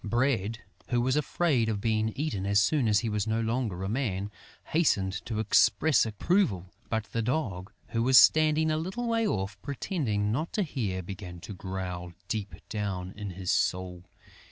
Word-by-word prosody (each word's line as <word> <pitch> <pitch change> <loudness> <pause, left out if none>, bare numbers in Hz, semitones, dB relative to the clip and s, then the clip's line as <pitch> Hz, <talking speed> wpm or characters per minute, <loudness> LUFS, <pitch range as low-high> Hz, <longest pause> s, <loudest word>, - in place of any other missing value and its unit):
Bread, 115 -1 0 0.2
who 120 - +1
was 130 +2 +1
afraid 150 -5 +1
of 105 -2 -1
being 110 0 +1
eaten 130 -10 -2
as 100 0 +4
soon 130 +4 +2
as 105 -1 +3
he 120 - -2
was 105 -1 -1
no 110 +1 +1
longer 115 -5 -1
a - - -2
man, 105 -4 -2 0.4
hastened 100 - +2
to 110 - -3
express 110 +5 +4
approval; 105 - 0 0.2
but 110 -1 0
the 115 - -1
Dog, 110 - -2 0.2
who 115 - -1
was 130 +2 +6
standing 155 0 +5
a 155 - +1
little 190 +9 -3
way 230 -1 +1
off, 95 - -3
pretending 125 - -1
not 155 +9 -2
to 210 - +1
hear, 105 - -3
began 90 -1 -8
to 105 - -7
growl 90 -2 -5
deep 105 -1 -3
down 95 -4 -3
in 105 -1 -5
his 90 0 -3
soul. 90 -1 -1
110 Hz, 175 wpm, -28 LUFS, 95-135 Hz, 0.4 s, was